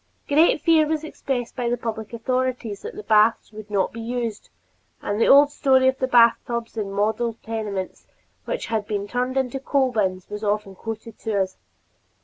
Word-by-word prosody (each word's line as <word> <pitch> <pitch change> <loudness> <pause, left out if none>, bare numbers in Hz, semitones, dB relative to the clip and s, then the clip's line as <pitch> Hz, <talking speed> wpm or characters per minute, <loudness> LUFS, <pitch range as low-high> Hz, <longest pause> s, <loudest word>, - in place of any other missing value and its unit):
Great 310 +2 +4
fear 320 -2 +4
was 315 0 -1
expressed 260 -6 -4
by 245 -2 -1
the 240 - 0
public 220 -2 -5
authorities 250 -2 -2
that - - -7
the - - -7
baths 215 +2 +3
would 215 -1 -10
not 200 -2 0
be 230 - -6
used, 230 -2 -4 0.5
and 205 +2 -2
the - - +4
old 285 +1 +7
story 265 -3 +3
of 260 0 +1
the 260 - 0
bathtubs 235 -1 +3
in 205 -3 -3
model 220 +3 0
tenements 210 -4 -5 0.4
which - - -3
had 220 -2 -2
been 205 -1 -2
turned 250 +4 -2
into 265 0 -1
coal 270 -1 +1
bins 185 -5 -1
was 210 +1 -7
often 205 -1 -1
quoted 225 +3 -8
to 205 -4 0
us. 185 0 -8
230 Hz, 180 wpm, -23 LUFS, 210-260 Hz, 0.5 s, old